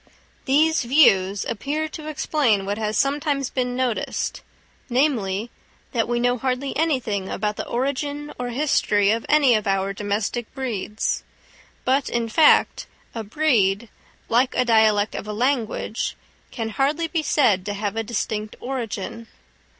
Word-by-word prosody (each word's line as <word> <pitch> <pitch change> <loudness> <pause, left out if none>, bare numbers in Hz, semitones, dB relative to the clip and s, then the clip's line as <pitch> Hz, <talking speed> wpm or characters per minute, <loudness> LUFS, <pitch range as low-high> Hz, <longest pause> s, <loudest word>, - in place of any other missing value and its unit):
These 310 +4 +3
views 205 -8 +4
appear 285 +8 -2
to 310 0 -8
explain 280 -9 +1
what 205 +2 -2
has 215 0 -1
sometimes 280 -1 0
been 250 -1 -1
noticed, 250 -3 -2 0.5
namely, 235 -5 0 0.4
that 230 -4 0
we 240 0 0
know 245 0 +1
hardly 260 +2 -2
anything 255 -11 0
about 210 0 -2
the - - -5
origin 285 +3 -2
or 245 0 -3
history 225 -6 +2
of 225 +1 -2
any 290 -5 +5
of 215 -2 0
our 195 0 0
domestic 210 +3 -2
breeds. 225 -5 -2 0.6
But, 265 +2 +2
in 235 -1 -1
fact, 300 +7 +4 0.3
a 225 - -4
breed, 220 -4 +1 0.4
like 250 +3 +2
a 250 - +3
dialect 220 -2 +3
of - - -6
a 210 - -3
language, 235 -2 -1 0.3
can 225 -3 -4
hardly 290 +8 0
be 325 -1 -1
said 230 -11 +2
to 205 - -2
have 205 0 -3
a 225 - 0
distinct 215 -1 -3
origin. 230 -3 -5
240 Hz, 140 wpm, -23 LUFS, 210-275 Hz, 0.6 s, any